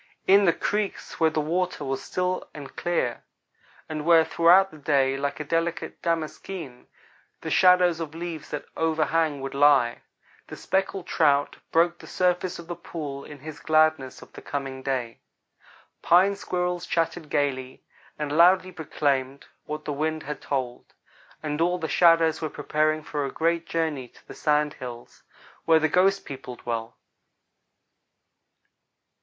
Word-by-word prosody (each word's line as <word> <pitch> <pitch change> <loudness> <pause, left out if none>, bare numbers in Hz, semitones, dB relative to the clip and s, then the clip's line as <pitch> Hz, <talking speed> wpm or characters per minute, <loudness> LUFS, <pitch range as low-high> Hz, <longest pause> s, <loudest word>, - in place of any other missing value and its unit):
In 200 +1 +6
the 170 - +6
creeks, 210 +2 -3
where 160 -1 +4
the 155 - -2
water 170 0 -1
was 135 0 -2
still 180 0 -2
and 145 -2 -9
clear, 170 -9 -1 0.7
and 155 -1 -4
where 165 0 +5
throughout 175 +4 +5
the 155 - -13
day, 135 -2 +2
like 140 +1 -3
a - - -2
delicate 165 +2 -2
damaskeen, 165 -4 -4 0.5
the - - -5
shadows 180 -2 +5
of 160 -1 -6
leaves 165 -3 -6
that 150 - -5
overhang 160 -2 0
would 135 - -5
lie, 140 -4 +4 0.5
the - - -8
Speckled 190 -1 -1
Trout 145 -5 +2
broke 170 +1 +2
the - - -12
surface 180 0 0
of 170 - -10
the 175 +1 -5
pool 145 -6 -7
in 145 -2 -11
his 155 0 -8
gladness 155 -4 +1
of - - -18
the - - -10
coming 135 -2 -5
day. 130 -4 -3 0.8
Pine 190 +4 +4
squirrels 180 -2 -2
chattered 165 -2 -1
gayly, 130 -3 -2 0.3
and 150 -1 -3
loudly 185 +2 +5
proclaimed 140 -4 -2 0.2
what 150 0 -6
the 150 - -2
wind 155 +2 -2
had 150 +1 -6
told; 130 -3 -4 0.5
and 150 0 -2
all 175 +2 +2
the 165 -3 -3
shadows 165 +1 +4
were 155 - -2
preparing 155 +1 0
for 150 -1 -3
a 135 - -3
great 170 +1 0
journey 155 -6 -2
to - - -23
the - - -9
Sand 150 -1 +1
Hills, 120 -2 -10 0.4
where 165 -1 +6
the 155 0 +2
ghost 195 +4 +2
people 130 -2 -8
dwell. 115 -1 -5
155 Hz, 150 wpm, -25 LUFS, 140-170 Hz, 0.8 s, In